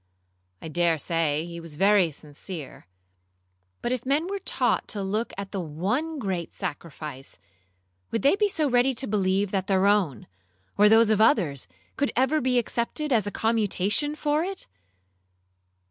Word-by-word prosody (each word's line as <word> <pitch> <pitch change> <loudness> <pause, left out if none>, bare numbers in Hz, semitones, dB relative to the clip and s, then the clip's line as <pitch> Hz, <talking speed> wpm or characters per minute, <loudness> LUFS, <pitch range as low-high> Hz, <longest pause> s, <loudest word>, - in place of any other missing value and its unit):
I - - -5
dare 170 0 +1
say 160 -1 0
he 170 0 -7
was 165 -3 -8
very 195 0 +4
sincere; 150 - -8 1.0
but 240 - -1
if 255 -2 -2
men 285 +5 +1
were 400 +1 -3
taught - - 0
to 205 -3 -3
look 215 +4 -2
to 200 0 -4
the 195 - -3
one 205 - -2
great 190 - -3
Sacrifice, 145 -3 -6 0.7
would 230 - -2
they 280 +6 +5
be 415 0 +2
so 315 -6 0
ready 250 0 +2
to 265 - 0
believe 200 -2 0
that 190 -2 -1
their 195 -1 +2
own, 195 - +2 0.5
or 210 +1 +6
those 225 0 +6
of 215 0 +3
others, 170 - +2 0.3
could 280 - 0
ever 265 +5 +2
be 250 0 +1
accepted 245 +5 -1
as 215 -4 +2
a - - -2
commutation 220 +6 +1
for 300 +1 0
it? 385 +1 -5
205 Hz, 160 wpm, -26 LUFS, 170-260 Hz, 1.0 s, or